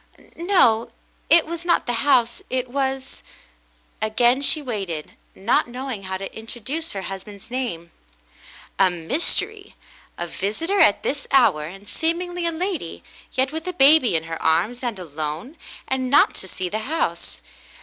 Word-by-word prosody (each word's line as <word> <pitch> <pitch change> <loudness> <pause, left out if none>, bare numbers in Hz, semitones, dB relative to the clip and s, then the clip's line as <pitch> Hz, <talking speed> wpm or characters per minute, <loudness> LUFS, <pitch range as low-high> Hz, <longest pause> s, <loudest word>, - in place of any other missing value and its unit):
"No, 335 - +3 0.4
it 335 -1 +6
was 340 +1 -5
not 345 0 +2
the 245 - -1
house 255 -4 +3
— - - -37
it 255 0 -1
was 265 0 -2 0.3
— - - -35
" - - -36
Again 240 +4 +3
she 285 +2 +3
waited, 195 - -4 0.2
not 200 +6 +2
knowing 245 -4 -5
how 190 0 -3
to 195 0 -7
introduce 245 +8 -5
her 195 -1 -4
husband's 195 +3 -8
name. 200 -10 -3 0.9
A 190 -1 +6
mystery! 335 - -2 0.4
A 175 - -3
visitor 220 - -2
at 205 - +5
this 280 0 -2
hour, 195 - +4
and 195 +5 -10
seemingly 340 +7 -1
a - - +1
lady, 330 - -4 0.3
yet 260 +1 +1
with 320 +2 -5
a 365 - -2
baby 280 - +6
in 160 - +1
her 165 0 -6
arms, 180 +10 +1
and 240 -5 -2
alone, 155 - -5 0.3
and 260 -1 -1
not 280 - +5
to 190 - -7
see 185 0 -4
the 215 +5 -2
house. 325 +1 -2
245 Hz, 160 wpm, -23 LUFS, 190-305 Hz, 0.9 s, it